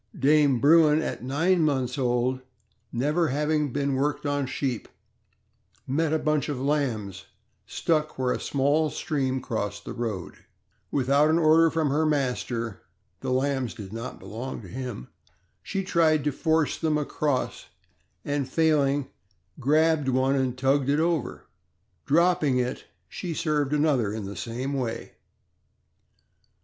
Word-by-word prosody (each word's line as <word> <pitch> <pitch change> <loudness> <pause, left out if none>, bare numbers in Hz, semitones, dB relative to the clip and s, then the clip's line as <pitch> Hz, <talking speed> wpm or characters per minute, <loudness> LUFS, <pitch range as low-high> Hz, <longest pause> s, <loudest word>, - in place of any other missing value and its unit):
Dame 145 -2 +4
Bruin 155 +2 +5
at 160 - -4
nine 165 +8 +2
months 130 -5 0
old, 125 -1 0 0.5
never 150 +7 +1
having 150 +1 0
been 140 +1 -1
worked 145 +2 -1
on 145 -1 0
sheep, 130 -3 -3 1.0
met 150 +4 0
a 160 - +3
bunch 155 -1 0
of 140 -4 -3
lambs 115 -10 -1 0.4
stuck 155 -2 -1
where 130 -1 +1
a - - -3
small 145 +3 +1
stream 135 -3 -1
crossed 105 -4 -4
the - - -5
road; 110 -7 -4 0.5
without 140 +3 +3
an 160 - +3
order 165 0 +5
from 160 -3 0
her 150 +3 +2
master 125 -6 -1 0.4
(the - - -4
lambs 130 -1 0
did 100 -1 -9
not 115 +3 -6
belong 115 +2 -6
to - - -10
him), 125 - -6 0.5
she 195 0 -3
tried 160 -5 +2
to 150 - +1
force 160 +2 0
them 155 -2 +1
across, 145 -2 -2 0.6
and 145 -2 -1
failing, 145 -3 +2 0.5
grabbed 150 +1 +2
one 130 +1 +2
and 130 -2 0
tugged 135 +1 +2
it 145 +2 +2
over. 165 -1 -1 0.6
Dropping 160 -4 +3
it, 125 +1 -2 0.2
she 175 -4 -5
served 150 -4 0
another 135 -8 +1
the 100 -1 -6
same 125 +7 -4
way. 125 -4 -3
140 Hz, 135 wpm, -26 LUFS, 125-155 Hz, 1.0 s, Bruin